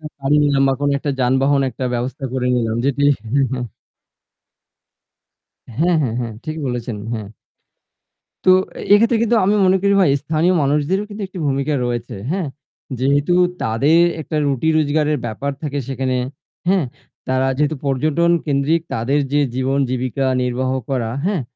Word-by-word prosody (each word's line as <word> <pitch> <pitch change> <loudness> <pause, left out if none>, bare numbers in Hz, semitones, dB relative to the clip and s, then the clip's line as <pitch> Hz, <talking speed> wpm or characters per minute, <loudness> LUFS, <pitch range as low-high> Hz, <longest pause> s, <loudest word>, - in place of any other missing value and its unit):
বা 155 - -9
গাড়ি 135 +2 +2
নিলাম 140 -2 +2
বা - - +3
কোন 145 - +1
একটা 145 - -2
যানবাহন 135 +3 +2
একটা 130 - -5
ব্যবস্থা 130 +3 -3
করে 130 -1 -1
নিলাম 115 -2 -1
যেটি 140 0 0 0.2
হ্যাঁ, 135 +5 +1
হ্যাঁ। 125 -2 -2 2.1
হ্যাঁ, 170 +5 +2
হ্যাঁ, 120 -5 -1
হ্যাঁ 115 -2 -4
ঠিক 155 0 -4
বলেছেন, 120 -3 -3 0.2
হ্যাঁ। 110 -3 -4 1.2
তো - - +6 0.4
এইক্ষেত্রে 230 +3 +5
কিন্তু 230 +1 +2
আমি 200 +3 +3
মনে 185 +1 +4
করি 200 0 +3
ভাই 165 -7 +4
স্থানীয় 160 +4 +1
মানুষদেরও 150 +8 +1
কিন্তু 210 0 -7
একটি 185 0 -10
ভূমিকা 140 +2 0
রয়েছে, 120 -1 -3 0.2
হ্যাঁ? 180 -3 -1 0.5
যেহেতু 140 +6 +2 0.3
তাদের 140 +10 +3 0.2
একটা 155 0 -4
রুটি 140 +2 0
রোজগারের 150 0 +1
ব্যাপার 120 +5 -3
থাকে 145 -2 -3
সেখানে, 130 -1 -1 0.5
হ্যাঁ? 190 -3 +3 0.4
তারা 130 0 +1
যেহেতু 150 +1 0
পর্যটন 155 +5 +1 0.2
কেন্দ্রিক 145 +3 +1
তাদের 130 +6 +1
যে 145 - +3
জীবন 130 +2 0
জীবিকা 130 +1 -1 0.2
নির্বাহ 125 +1 -1 0.2
করা, 120 -4 -1
হ্যাঁ? 190 -5 0
140 Hz, 150 wpm, -19 LUFS, 130-155 Hz, 2.1 s, তো